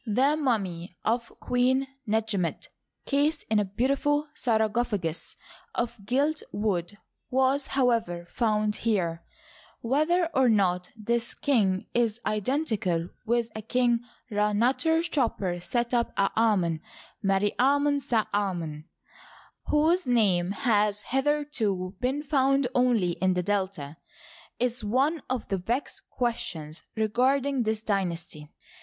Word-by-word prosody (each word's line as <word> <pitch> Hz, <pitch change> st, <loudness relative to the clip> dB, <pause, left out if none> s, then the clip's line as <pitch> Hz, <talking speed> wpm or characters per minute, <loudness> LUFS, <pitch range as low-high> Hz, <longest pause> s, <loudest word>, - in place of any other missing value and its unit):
The 260 Hz, +8 st, +3 dB
mummy 195 Hz, -, -1 dB
of 235 Hz, +1 st, 0 dB
Queen 255 Hz, +2 st, +2 dB, 0.2 s
Netjemet, 210 Hz, -5 st, -1 dB, 0.4 s
cased 295 Hz, +2 st, +1 dB
in 215 Hz, -, +4 dB
a 205 Hz, -, +1 dB
beautiful 280 Hz, +8 st, 0 dB
sarcophagus 220 Hz, -, 0 dB, 0.4 s
of 235 Hz, -3 st, -3 dB
gilt 290 Hz, +6 st, +1 dB
wood, 205 Hz, -2 st, -1 dB, 0.3 s
was, 265 Hz, +2 st, +2 dB
however, 225 Hz, -10 st, +1 dB
found 215 Hz, 0 st, 0 dB
here. 175 Hz, -7 st, -1 dB, 0.6 s
Whether 310 Hz, +9 st, +2 dB
or 265 Hz, -2 st, +4 dB
not 180 Hz, -4 st, +2 dB
tnis 235 Hz, +2 st, -2 dB
king 200 Hz, -9 st, +2 dB
is 235 Hz, -2 st, +1 dB
identical 210 Hz, -, 0 dB, 0.2 s
with 235 Hz, 0 st, +1 dB
a 220 Hz, -, -4 dB
King 240 Hz, +1 st, +2 dB, 0.3 s
Rd'fiuter 245 Hz, +11 st, +2 dB
choper'Setep'en'Afnon, 215 Hz, -, 0 dB, 0.4 s
Meri 195 Hz, +1 st, +1 dB
Amon'Sa" 280 Hz, -3 st, +2 dB
Amon, 170 Hz, -7 st, -2 dB, 0.8 s
whose 320 Hz, +3 st, +2 dB
name 195 Hz, -8 st, +3 dB
has 210 Hz, 0 st, +1 dB
hitherto 265 Hz, -10 st, 0 dB
been 265 Hz, +4 st, -1 dB
found 275 Hz, -2 st, +2 dB
only 245 Hz, -8 st, +3 dB
in 185 Hz, +2 st, 0 dB
the 180 Hz, -, 0 dB
Delta, 185 Hz, -7 st, -2 dB, 0.6 s
is 245 Hz, -1 st, -1 dB
one 270 Hz, +9 st, +1 dB
of 255 Hz, -3 st, -2 dB
the 195 Hz, -, 0 dB
vexed 235 Hz, +10 st, -3 dB
questions 170 Hz, -10 st, -3 dB
regarding 255 Hz, +5 st, +1 dB
this 220 Hz, -1 st, -1 dB
dynas 185 Hz, -5 st, -1 dB
ty. 150 Hz, -1 st, -10 dB
225 Hz, 110 wpm, -27 LUFS, 195-260 Hz, 0.8 s, in